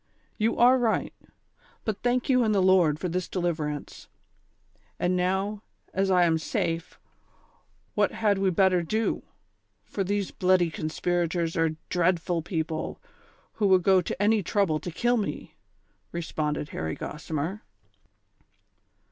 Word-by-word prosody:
"You 220 +2 +1
are 250 +2 +6
right, 230 -3 0 0.7
but 215 -3 -2
thank 245 0 +1
you 255 -2 +4
and 215 -2 +2
the - - +4
Lord 185 -5 +4
for 180 - -3
tliis 180 +1 -2
deliverance; 155 -5 -3 0.9
and 180 +1 +1
now, 190 +3 0 0.3
as 195 +1 +1
I 180 -1 +5
am 165 -2 +3
safe, 170 -3 -3 0.9
what - - +2
had 205 -3 +1
we 195 -1 +2
better 185 0 +3
do, 220 +7 -1 0.6
for 195 - -3
these 200 0 -1
bloody 180 -2 +2
conspirators 170 +1 -1
are 165 -1 +1
dreadful 175 -1 +1
people, 160 -2 -3 0.6
who 205 - +4
would 185 -2 +4
go 190 0 +5
to 175 - -5
any 210 +1 +3
trouble 180 -4 +1
to 175 - -6
kill 240 +8 +1
me 210 - -2
V - - -17 0.3
" - - -43
responded 150 -3 -2
Harry 80 0 -4
Gossiraer. 160 +5 -4
180 Hz, 140 wpm, -27 LUFS, 165-205 Hz, 0.9 s, are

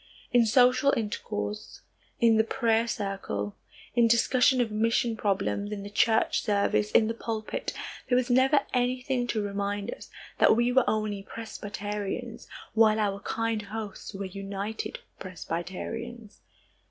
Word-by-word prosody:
In 240 -2 +5
social 255 +4 +5
intercourse, 105 - -4 0.4
in 230 -1 +5
the 220 - +5
prayer 225 0 +1
circle, 195 - -3 0.4
in 235 -1 +4
discussion 250 +2 +4
of 235 -3 +1
mission 225 +2 +1
problems, 200 0 -1
in 205 -1 -4
the 205 - -8
church 220 +1 +3
service, 200 - +1
in 220 - +4
the 225 - -1
pulpit, 225 -1 -4 0.4
there 245 - +4
was 250 -1 +2
never 265 +3 +4
anything 250 0 0
to 215 -3 -1
remind 200 +2 -2
us - - -12 0.3
that - - +6
we 240 +2 +2
were 260 0 +4
only 215 -2 -1
Presbyterians 210 +1 -5 0.3
while 220 -1 +5
our 200 -2 0
kind 225 +1 -1
hosts 210 0 -7
were 195 0 -4
United 200 - -5 0.2
Presbyterians. 200 +6 -6
220 Hz, 135 wpm, -28 LUFS, 200-235 Hz, 0.4 s, that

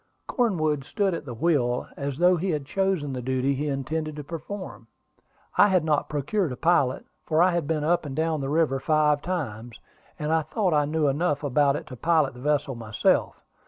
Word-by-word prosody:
Cornwood 155 - 0
stood 195 +6 -1
at 165 - -5
the 125 -4 -6
wheel, 125 -4 +1
as 140 -1 -4
though 180 +2 +5
he 180 +3 -2
had 150 -4 -1
chosen 190 -5 -1
the 125 - -4
duty 130 +2 0
he 145 +2 -2
intended 150 +3 -3
to 150 - -6
perform. 170 +6 -7 0.7
I - - +8
had 185 -5 +2
not 150 -2 +1
procured 150 +4 -1
a - - -4
pilot, 160 -3 +1 0.2
for 155 0 0
I 185 - +4
had 170 -4 -1
been 155 -2 -1
up 170 +3 +2
and 140 -3 -6
down 160 -1 0
the 135 - -3
river 150 -3 +1
five 150 0 +2
times, 120 -11 -4 0.4
and 150 +1 -1
I 160 - +3
thought 180 +4 -1
I 150 -1 +3
knew 155 0 0
enough 145 +1 0
about 140 0 +2
it - - -5
to 130 - -9
pilot 160 0 +2
the 125 - -12
vessel 145 0 0
myself. 110 -2 0
150 Hz, 200 wpm, -25 LUFS, 135-165 Hz, 0.7 s, I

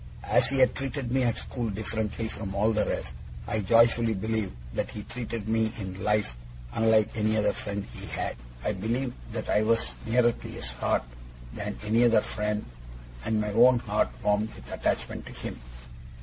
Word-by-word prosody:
As - - +3
he 135 - 0
had 130 -1 +5
treated 135 -2 -3
me 130 +1 +3
at 120 -2 +1
school 120 -3 -3
differently 110 +2 -2
from 100 -3 -5
all 105 +3 +3
the 105 - +1
rest, 65 - -3 0.3
I 110 - -1
joyfully 115 +2 +4
believed 110 - -1 0.2
that - - -1
he 105 - -6
treated 115 -2 -5
me 110 0 +2
in 95 -2 -6
life 105 - +1 0.4
unlike 110 -1 +4
any 110 0 +2
other 105 - +2
friend 100 -1 -4
he - - -8
had. - - -2 0.3
I 105 - +1
believed 115 +6 -1 0.2
that - - -3
I 105 - +3
was 115 +1 +2
nearer 120 +1 +4
to - - -9
his - - -5
heart - - 0 0.5
than 105 +5 -4
any 110 +3 +3
other 115 -2 +6
friend, 105 0 -2 0.6
and 110 -1 +1
my 105 0 -1
own 125 +3 +7
heart 115 - +1
warmed 105 +1 +2
with - - -12
attachment - - -1
to - - -8
him. - - -6
110 Hz, 180 wpm, -28 LUFS, 105-115 Hz, 0.6 s, own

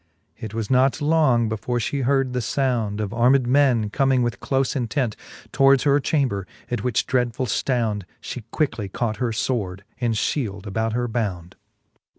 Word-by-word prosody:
It 110 -1 -8
was 115 +1 -3
not 130 +3 +3
long 145 -7 +3
before 110 +3 -2
fhe 135 +3 -1
heard 135 -1 +1
the 125 - -1
found 115 -4 -1
Of 105 -1 -3
armed 125 +2 +4
men, 125 -5 +3
comming 135 0 +2
with 120 -1 -2
clofe 135 0 0
intent 125 -2 -1 0.4
Towards 135 0 +4
her 140 0 +4
chamber; 130 - 0 0.2
at 120 - -2
which 125 -4 +1
dreadfull 125 -1 0
ftound 110 -2 -1
She 125 - -6
cjuickly 115 -10 -1
caught 110 -1 -2
her 125 -2 0
fword, 110 -5 -2 0.2
and 120 -2 0
/hield 105 -4 -2
about 110 +2 -1
her 120 +1 0
bound. 95 -6 -3
120 Hz, 165 wpm, -23 LUFS, 110-135 Hz, 0.4 s, armed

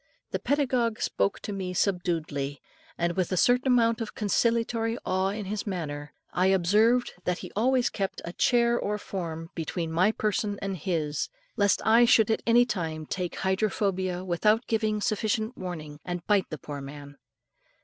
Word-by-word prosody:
The - - -1
pedagogue 250 -5 +1
spoke 200 - 0
to 205 - -5
me 185 -2 -4
subduedly, 160 -7 -1 0.4
and 170 0 0
with 185 -1 0
a 185 - 0
certain 250 +7 +3
amount 230 -2 +3
of 225 - -5
conciliatory 230 +2 +1
awe 185 +1 +1
in 205 +1 -4
his 210 +2 -4
manner, 150 -6 -4 0.2
and - - -1
I - - +5
observed 210 +7 +3
that 180 -1 0
he - - -9
always 250 +3 +2
kept 195 -2 -3
a 170 - -6
chair 235 +1 +3
or 210 +1 -1
form 165 -5 -5
between 165 0 -3
my 180 +6 +3
person 215 -1 -1
and 195 -1 -3
his, 155 -3 -2 0.3
lest 205 -2 +2
I 230 +3 +6
should 225 -2 +5
at 220 - +1
any 240 +1 +6
time 160 -8 -3
take 180 +2 -3
hydrophobia 190 -2 0
without 210 +6 +2
giving 215 -2 0
sufficient 220 +3 0
warning, 155 -5 -6
and 175 -1 -5
bite 205 -3 +2
the 155 - -5
poor 145 -1 -7
man. 145 +1 -10
195 Hz, 170 wpm, -27 LUFS, 170-225 Hz, 0.4 s, I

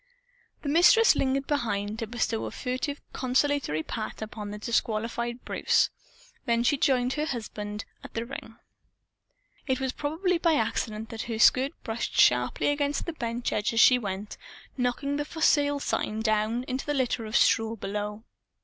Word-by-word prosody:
The 285 - -2
Mistress 355 +9 +6
lingered 270 +1 0
behind, 215 -7 -1
to 225 - -3
bestow 225 -1 -1
a - - -5
furtive 255 +3 -3
consolatory 260 - 0
pat 215 +4 -5
upon 215 -1 -6
the 210 - -6
disqualified 235 +2 -2
Bruce. - - +2 0.6
Then 235 0 +2
she 290 - +3
joined 255 -2 +2
her 300 +1 -1
husband 210 -5 -5 0.2
beside - - -12
the 230 0 -2
ring. 235 -3 -8 1.1
It 260 -1 +1
was 265 -1 -1
probably 335 +6 -1
by 335 -1 +3
accident 220 -6 -2
that 225 -1 -5
her 225 - -2
skirt 260 +6 +4
brushed 225 +1 -3
sharply 125 - +4
against 290 0 0
the 340 - -4
bench 235 -4 -3
edge 210 +2 0
as 225 - +1
she 250 0 +7
went 200 -1 -5 0.4
knocking 275 +3 -1
the 295 - -1
"For 320 +2 -9
Sale" 290 -2 +3
sign 215 -4 -1
down 220 +2 +1
into 260 +2 -4
the 295 - 0
litter 245 -4 -1
of 215 - -5
straw 225 0 +3
below. 210 +1 -4
240 Hz, 165 wpm, -27 LUFS, 220-280 Hz, 1.1 s, she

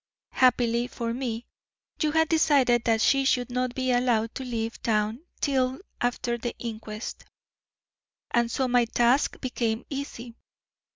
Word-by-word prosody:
Happily 240 -2 +3
for 230 -2 -4
me, 240 -2 -3 0.6
you 305 -2 +2
had 320 +1 +3
decided 275 -7 +3
that 225 -2 +2
she 275 +3 +4
should 250 -2 +1
not 250 0 -1
be 255 -1 0
allowed 240 -3 +1
to 265 - -5
leave 230 -2 -4
town 215 +2 0 0.2
till 260 -2 +1 0.2
after 240 0 -1
the 240 +1 -4
inquest, 220 -1 -6 1.1
and 235 -1 +2
so 260 +2 0
my 245 -1 +3
task 240 +4 +2
became 235 -3 -2
easy. 260 -4 -6
245 Hz, 135 wpm, -26 LUFS, 230-260 Hz, 1.1 s, she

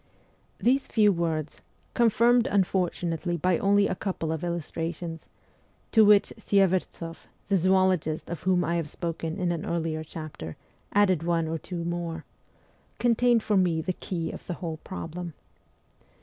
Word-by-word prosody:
These 265 +3 +2
few 210 -2 +4
words 160 -3 -2 0.3
confirmed 235 +1 +4
unfortunately 175 - 0
by 180 +2 +1
only 200 +1 +4
a - - -1
couple 185 -4 -3
of 160 0 -3
illustrations 165 -1 -4 0.6
(to 220 - +6
which 205 -1 +5
Syevertsoff, 185 -4 0 0.2
the 200 - +4
zoologist 185 -3 +2
of 170 - -5
whom 180 -1 +2
I 170 +2 0
have 165 -3 -3
spoken 165 0 -4
in 180 -3 0
an 165 -2 -3
earlier 160 -2 -2
chapter, 155 - -8 0.3
added 190 -5 +3
one 165 -1 0
or 160 0 -2
two 175 0 -5
more) 170 -1 -3 0.7
contained 240 -1 +3
for 210 - +2
me 175 -3 +2
the 185 +3 -2
key 170 -2 -4
of - - -10
the 175 - -3
whole 165 -3 -5
problem. 165 - -7
175 Hz, 145 wpm, -27 LUFS, 165-195 Hz, 0.7 s, to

